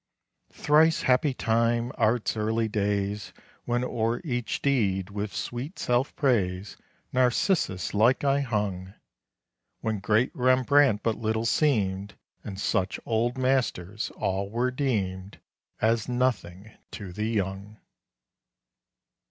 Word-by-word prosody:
Thrice 155 +2 +3
happy 130 +3 +3
time! 115 +2 +1
Art's 110 +1 +1
early 110 +1 0
days! 105 -1 -2 0.3
When 120 +1 0
o'er 115 -1 -1
each 120 - -2
deed, 100 -9 +1
with 100 0 -4
sweet 130 +9 -5
self 125 +3 0
praise, 100 -8 0 0.4
Narcissus 125 - +1
like 115 +7 +3
I 140 0 +3
hung! 105 -7 -2 0.9
When 110 -2 -1
great 110 +5 +1
Rembrandt 130 -2 +3
but 115 -2 0
little 110 0 -1
seemed, 100 -7 +1 0.3
And 95 -2 -7
such 95 -2 0
Old 120 +3 0
Masters 120 -7 0
all 95 +1 -2
were 120 +4 0
deemed 100 -8 -2 0.4
As 115 +1 +1
nothing 110 -6 -1 0.2
to 95 -4 -7
the 105 +4 -2
young! 100 0 -3
110 Hz, 110 wpm, -27 LUFS, 100-125 Hz, 0.9 s, Thrice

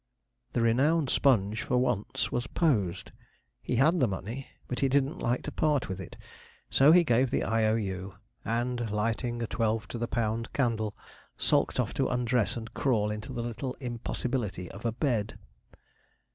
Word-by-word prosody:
The 120 - +1
renowned 135 +5 +3
Sponge, 110 -5 +3
for 125 - 0
once, 115 -2 0
was 120 0 -1
posed. 105 - 0 0.5
He - - -2
had 155 +8 +4
the 130 - +4
money, 110 +7 -5 0.2
but 125 - -3
he 135 - +2
didn't 140 +5 +1
like 120 +1 0
to 150 - -4
part 145 -5 +1
with 95 0 -4
it. 90 - -10 0.5
So 140 +3 +6
he 175 +1 +7
gave 130 -3 +3
the - - 0
'I.O.U.' 105 -4 0 0.3
and, 120 0 -1
lighting 115 +3 -1
a - - 0
twelve 110 -1 -1
to 120 - -5
the 120 - -1
pound 115 -1 -1
candle, 110 -6 0 0.4
sulked - - +2
off - - 0
to - - +1
undress 125 -2 +1
and 110 -1 -7
crawl 110 -6 +1
into 105 +5 -5
the 120 -2 -3
little 120 +3 -4
impossibility 120 -5 -3
of 100 +4 -10
a - - +1
bed. 115 -3 -1
120 Hz, 165 wpm, -29 LUFS, 110-130 Hz, 0.5 s, he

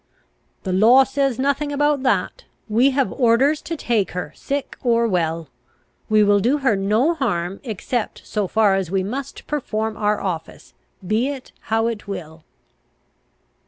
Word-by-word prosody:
"The 185 - -2
law 230 +8 +6
says 270 -1 0
nothing 280 +2 0
about 290 -1 +1
that. 270 - 0 0.2
We 235 +5 +4
have 275 -1 0
orders 260 +5 +3
to 330 - -5
take 230 -8 0
her 180 0 -5
sick 280 0 -4
or 235 -1 +2
well. 165 -5 -1 0.6
We 215 -1 +5
will 205 0 +4
do 245 +8 +2
her 265 -7 +2
no 215 - +2
harm 185 - -2
except 225 0 -4
so 210 -3 -2
far 210 0 +3
as 190 -3 -1
we 190 0 0
must 260 +7 -6
perform 220 -7 -2
our 210 0 0
office, 170 -5 -5 0.3
be 215 +7 +1
it 275 -3 -6
how 225 0 +1
it 225 -3 -3
will." 160 -5 -7
225 Hz, 155 wpm, -21 LUFS, 195-270 Hz, 0.6 s, law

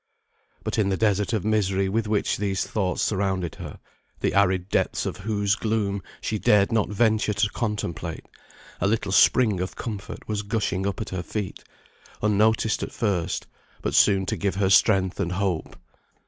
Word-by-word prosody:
But, - - -2
in 100 -2 +2
the 95 - 0
desert 105 -2 +1
of 110 -4 -1
misery 100 -3 +1
with 110 +3 -1
which 105 -1 0
these 100 -1 -1
thoughts 95 -4 -1
surrounded 95 -4 -1
her, - - -7 0.4
the - - 0
arid 95 -2 +2
depths - - 0
of - - -3
whose 100 0 0
gloom 105 -3 -1 0.2
she 110 - -2
dared 100 -1 +4
not 110 -3 +1
venture 110 0 +2
to 105 +1 +1
contemplate, 90 -8 -3 0.5
a - - +1
little 105 -2 0
spring 105 0 +4
of 90 +1 -4
comfort 105 -4 -6
was 105 -1 -1
gushing 100 -2 -1
up 100 - -3
at - - -4
her 95 -2 -3
feet, 100 +2 -5 0.6
unnoticed 110 +1 +2
at - - -4
first, 95 -5 -1 0.4
but - - -1
soon 95 -2 +4
to - - -1
give 100 -2 -1
her 95 -1 +1
strength 95 -2 +4
and 90 -2 -1
hope. 95 -3 -2
100 Hz, 170 wpm, -25 LUFS, 95-110 Hz, 0.6 s, dared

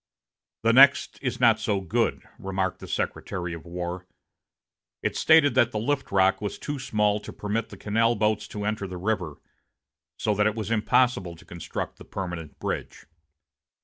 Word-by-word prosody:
"The 115 0 +4
next 135 0 +6
is 125 -3 -2
not 115 -3 +5
so 105 -2 0
good," 95 -4 0 0.2
remarked 95 -1 -2
the - - -9
Secretary 85 -2 -3
of 85 +1 -9
War. 90 +1 -5 1.0
It - - -1
stated 155 -4 +5
that 125 -2 +4
the 110 - -3
lift 140 +6 -1
lock 95 0 +3
was 105 - -3
too 145 -1 -5
small 105 -5 +1
to - - -9
permit 105 +2 -3
the 100 - -11
canal 115 +4 +1
boats 105 0 0
to 105 -1 -5
enter 105 -2 -2
the 90 -1 -7
river, 90 -5 -2 0.8
so 105 - 0
that 105 +1 +2
it 110 - -1
was 110 -1 -4
impossible 105 -4 +2
to 80 - -17
construct 85 -2 -6
the - - -13
permanent 85 -5 -6
bridge. - - -5
105 Hz, 170 wpm, -26 LUFS, 95-115 Hz, 1.0 s, next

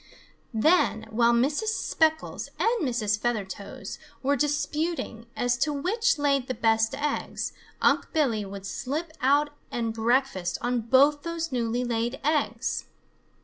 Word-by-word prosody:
Then, 225 -2 +3
while 235 +1 +4
Mrs. 280 - +1
Speckles 315 -1 0
and 460 -1 +1
Mrs. 220 -6 0
Feathertoes 200 -4 -4 0.2
were 280 +2 +3
disputing 295 -3 -1
as 245 -2 +1
to 300 +3 +2
which 365 +8 +1
laid 280 -3 +1
the 255 - -2
best 225 +2 +2
eggs, 290 +1 -2 0.3
Unc' - - +3
Billy 250 -9 +1
would 195 0 -8
slip 295 +10 -3
out 285 +3 +3 0.2
and 230 -2 -2
breakfast 225 -6 +1
on 245 0 0
both 275 +6 +4
those 335 -1 -3
newly 240 0 0
laid 240 +1 -1
eggs. 265 -6 0
255 Hz, 130 wpm, -27 LUFS, 230-295 Hz, 0.3 s, while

